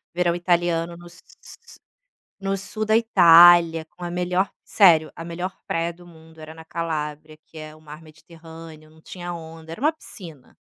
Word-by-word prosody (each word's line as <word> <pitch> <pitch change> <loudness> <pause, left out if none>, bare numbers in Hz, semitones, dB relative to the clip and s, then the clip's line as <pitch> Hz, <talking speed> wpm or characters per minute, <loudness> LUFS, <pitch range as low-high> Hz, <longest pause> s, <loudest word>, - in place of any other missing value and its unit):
verão 175 -1 +1
italiano 175 -1 -1
no 175 0 -14
su 175 - -15 1.2
no 195 0 -2
sul 215 +2 -4
da 220 +1 +2
Itália, 170 -6 +6
com 175 0 -22
a 175 - -4
melhor, 180 +2 -1
sério, 165 -6 +4
a 165 - -9
melhor 175 +2 -6
praia 165 +1 -2
do 175 +1 -18
mundo 160 -1 -18
era 155 0 -10
na 160 - -13
Calábria, 155 -2 -5
que 160 - -17
é 155 0 -10
o 155 - -20
mar 150 +1 -12
mediterrâneo. 160 0 -15
Não 160 0 -22
tinha 175 0 -8
onda, 160 -1 -11
era 220 - -12
uma 305 - +3
piscina. 165 - -12
165 Hz, 175 wpm, -22 LUFS, 160-175 Hz, 1.2 s, Itália